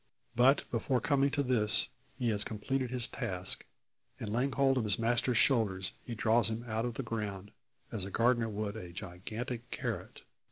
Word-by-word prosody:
But 130 +4 +3
before 125 +2 -1
coming 140 +2 +1
to 140 0 -2
this, 115 -5 +7 0.3
he 125 -3 -2
has 105 -2 +3
completed 130 +5 -4
his 125 -1 +4
task, 90 0 -1 0.5
and 105 -1 -6
laying 130 +4 -1
hold 135 -1 +1
of - - -2
his 105 0 +4
master's 120 +1 +2
shoulders, 100 -9 +1
he 120 - -7
draws 115 +1 +3
him 110 +1 -5
out 110 +1 -3
of 120 -2 -5
the 135 - -5
ground, 105 -4 -6 0.4
as 105 -4 -2
a 100 - -6
gardener 115 +1 0
would 105 0 -5
a 90 -5 -9
gigantic 110 +7 -7
carrot. - - -6
115 Hz, 175 wpm, -30 LUFS, 105-125 Hz, 0.5 s, this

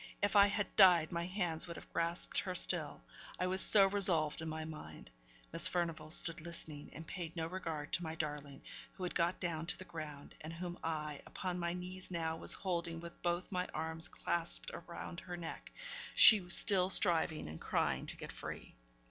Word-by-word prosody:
If 205 +1 -1
I 200 0 +7
had 205 0 -3
died, 180 -5 +6
my 170 0 -3
hands 180 -4 -3
would 170 - -7
have - - -13
grasped 170 +1 +2
her 185 -2 -4
still, 165 -4 +1 0.4
I 180 - 0
was 185 +1 +5
so 200 -2 +8
resolved 180 -7 +2
in 160 - -5
my 160 0 -5
mind. 80 - -11 0.4
Miss - - +6
Furnivall 170 -3 -3
stood 165 0 +1
listening, 160 -3 -6
and 160 - -10
paid 170 0 -7
no 165 -1 -3
regard 165 -4 -6
to - - +1
my 160 -1 -5
darling, 145 -3 -6 0.3
who 185 - -9
had 180 - -4
got 175 +1 0
down 165 -2 -4
to - - -1
the 185 - -10
ground, 155 -4 -9
and 155 +2 -8
whom 175 +1 -7
I, 150 -3 -4
upon 180 -1 -5
my 170 0 -2
knees 180 +1 -7
now, 165 -2 -3
was - - +2
holding 170 -3 -4
with 170 0 -11
both 175 +2 -2
my 180 -1 -2
arms 160 +1 -1
clasped 170 -1 0 0.2
round 170 0 -8
her 180 -2 -8
neck; 170 -1 -8 0.4
she 200 -5 +8
still 185 0 +5
striving 165 -5 +4
and 80 +1 -9
crying - - -1
to - - -4
get - - -8
free. - - -9
170 Hz, 190 wpm, -34 LUFS, 160-180 Hz, 0.4 s, so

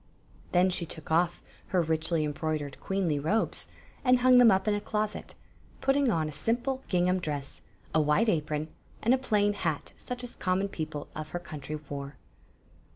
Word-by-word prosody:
Then 185 +1 +4
she 175 -2 -1
took 160 0 -7
off 170 +1 +2 0.2
her 180 -3 +2
richly 160 0 0
embroidered 150 -1 -2
queenly 185 -7 0
robes, 200 +10 0 0.4
and 250 -2 +5
hung 255 0 +7
them 245 -2 +8
up 190 0 +3
in 210 - +4
a 205 - -1
closet, 215 0 -2 0.4
putting 270 0 +3
on 160 -7 +1
a - - -4
simple 240 - -1
gingham 180 0 +2
dress, 145 -5 -4 0.3
a 160 - +4
white 150 +9 +3
aprcm, 155 -4 0 0.3
and 235 - +5
a 265 - +3
fAaan 210 -5 +2
hat 160 -7 -2
such 250 0 -6
as 245 - -8
common 190 +1 0
people 155 -4 -5
of 155 0 -5
her - - -4
country 155 -3 -6
wore. 140 0 -6
175 Hz, 170 wpm, -29 LUFS, 155-215 Hz, 0.4 s, them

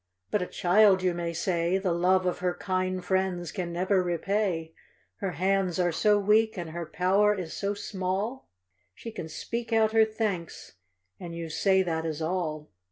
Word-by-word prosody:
But 210 - +1
a 180 - -2
child, 190 +1 +4
you 180 -1 +2
may 170 -1 -3
say, 170 +1 0
The 190 -3 0
love 185 +2 +2
of 180 - -1
her 180 -1 -1
kind 185 -1 -2
friends 185 -2 0
can 180 -4 -4
never 185 +2 +1
repay. 175 -1 -1 0.4
Her 190 -3 -3
hands 185 +2 0
are 175 -1 +2
so 210 +5 +3
weak, 215 +2 +3
and 170 -3 -5
her 170 0 -5
power 200 +5 +2
is 180 -5 -5
so 200 +1 -2
small: 200 +5 -3 0.5
She 230 - -8
can 160 -6 -7
speak 235 +9 -5
out 220 -1 +3
her 225 0 +5
thanks, 215 -6 -3 0.5
and 170 -1 -7
you 165 -1 -5
say 190 +3 +3
that 160 -2 -2
is 160 -2 -3
all. 160 -3 -3
185 Hz, 175 wpm, -28 LUFS, 170-200 Hz, 0.5 s, her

